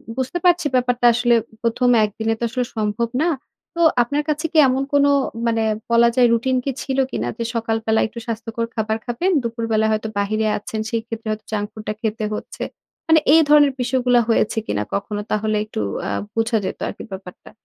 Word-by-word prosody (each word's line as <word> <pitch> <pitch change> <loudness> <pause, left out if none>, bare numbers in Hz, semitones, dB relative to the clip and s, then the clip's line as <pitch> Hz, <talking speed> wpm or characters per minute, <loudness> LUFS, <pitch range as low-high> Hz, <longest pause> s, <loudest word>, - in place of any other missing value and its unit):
বুঝতে 260 +6 -2
পারছি 350 -3 +4
ব্যাপারটা 245 -1 +1
আসলে 240 0 +3 0.3
প্রথম 240 +2 +1
একদিনে 220 +2 -1
তো - - -4
আসলে 250 +1 -1
সম্ভব 220 +2 -1
না। 345 - +2 0.5
তো 340 - -1 0.2
আপনার 290 +5 -1
কাছে 305 +2 -1
কি 320 - -1
এমন 260 +1 +1
কোনো 285 0 +5 0.4
মানে 225 -1 +1 0.3
বলা 235 0 +5
যায় 245 -1 +5
রুটিন 255 +3 +1
কি 275 - 0
ছিল 265 -1 -3
কিনা? 115 - -2
যে 230 - -2
সকালবেলা 225 -1 0
একটু 235 - -9
স্বাস্থ্যকর 230 0 -3
খাবার 220 0 -1
খাবেন, 340 +11 0
দুপুরবেলা 225 -2 0
হয়তো 215 0 -1
বাহিরে 215 +2 0
আছেন 215 +1 -5
সেই 230 -1 -1
ক্ষেত্রে 225 -1 -6
হয়তো 215 0 -5
জাঙ্ক 205 -1 -1
ফুড 215 0 -10
টা 215 - -1
খেতে 220 0 -2
হচ্ছে। - - -6 0.4
মানে 320 0 +6
এই 325 - +7
ধরণের 290 -2 +6
বিষয়গুলা 250 -1 +2
হয়েছে 225 0 +1
কিনা 105 - -1
কখনো? 205 +1 -2
তাহলে 215 0 0
একটু 210 - -6 0.3
আ - - -2 0.3
বোঝা 225 0 +1
যেত - - -4
আরকি - - -7
ব্যাপারটা। 190 -1 -10
230 Hz, 185 wpm, -21 LUFS, 220-255 Hz, 0.5 s, এই